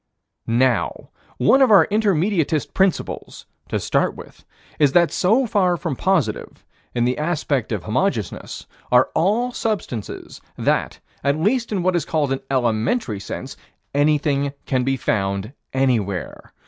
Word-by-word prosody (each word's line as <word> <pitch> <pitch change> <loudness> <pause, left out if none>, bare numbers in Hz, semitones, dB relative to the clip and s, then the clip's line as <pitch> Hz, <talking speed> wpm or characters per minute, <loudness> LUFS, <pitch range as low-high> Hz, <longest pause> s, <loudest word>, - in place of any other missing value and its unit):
Now, 120 +1 0 0.3
one 135 - +4
of 265 - +6
our 205 -3 +7
Intermediatist 190 -6 +1
principles, 190 -2 -1 0.2
to - - -1
start - - 0
with, - - -13 0.4
is 145 -3 +4
that 170 -1 +4
so 225 +8 +2
far 185 -5 +2
from 165 -5 -3
positive, 185 0 -1 0.3
in 120 -1 +2
the 125 +3 0
aspect 150 -7 -1
of 105 -5 -2
Homogeneousness, 115 - -2 0.3
are 125 +1 +4
all 220 +8 +1
substances, 205 - -4 0.2
that, - - 0 0.2
at 140 +2 +1
least 230 +7 +1
in 195 -4 -1
what 185 0 +2
is 170 - 0
called 150 -4 0
an 135 - -2
elementary 120 - 0
sense, 100 - -7 0.4
anything 145 -1 +1
can 130 -2 0
be 135 +1 0
found 100 0 -1 0.2
anywhere. 115 - -1
145 Hz, 135 wpm, -21 LUFS, 125-190 Hz, 0.4 s, our